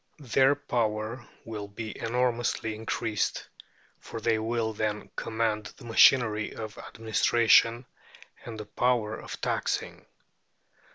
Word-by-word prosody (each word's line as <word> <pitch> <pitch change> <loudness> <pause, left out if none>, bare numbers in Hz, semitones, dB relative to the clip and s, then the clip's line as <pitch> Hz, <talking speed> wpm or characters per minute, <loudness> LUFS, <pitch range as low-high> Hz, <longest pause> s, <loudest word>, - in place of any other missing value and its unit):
Their 135 0 +3
power 115 -3 -2 0.2
will 105 -2 -6
be 110 +2 -7
enormously 120 -1 0
increased, 110 0 -2 0.5
for 115 - -7
they 110 0 +1
will 110 0 -1
then 105 0 -3
command 110 -2 -1
the - - -13
machinery 115 -2 +4
of 110 -2 -6
administration, 115 +2 +3 0.6
and 115 -2 -7
the 105 - -6
power 110 0 0
of - - -8
taxing. - - -2
115 Hz, 110 wpm, -28 LUFS, 110-120 Hz, 0.6 s, machinery